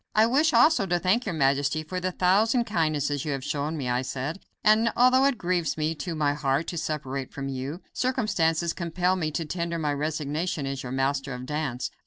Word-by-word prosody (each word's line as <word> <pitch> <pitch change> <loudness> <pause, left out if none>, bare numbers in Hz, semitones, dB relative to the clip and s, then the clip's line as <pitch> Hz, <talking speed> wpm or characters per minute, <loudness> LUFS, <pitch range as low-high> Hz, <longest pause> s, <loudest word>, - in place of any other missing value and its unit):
"I 215 +1 +6
wish 290 +7 +3
also 310 -13 +4
to 175 0 +2
thank 195 +7 +1
your 180 - -2
majesty 140 +1 +1
for 185 +4 -4
the 185 0 -2
thousand 210 +7 +3
kindnesses 155 - 0
you 150 - -2
have 135 -1 -4
shown 150 +2 -2
me," 135 -4 -3
I 125 +1 +1
said, 135 +6 -4 0.2
"and, 220 +1 +4
although 255 +2 +5
it 275 -3 +2
grieves 175 -5 -1
me 155 +1 0
to 165 +2 -5
the 145 -2 +1
heart 145 +1 0
to 170 - -5
separate 140 -4 -4
from 135 -1 -5
you, 135 +6 -5
circumstances 180 -10 0
compel 180 +1 0
me 165 -4 -1
to 160 +2 -3
tender 170 +1 -3
my 150 -3 0
resignation 150 +1 -2
as 135 -1 -3
your 125 - -6
Master 135 0 -1
of 125 0 -7
Dance." 140 -3 -3
155 Hz, 205 wpm, -26 LUFS, 140-185 Hz, 0.2 s, I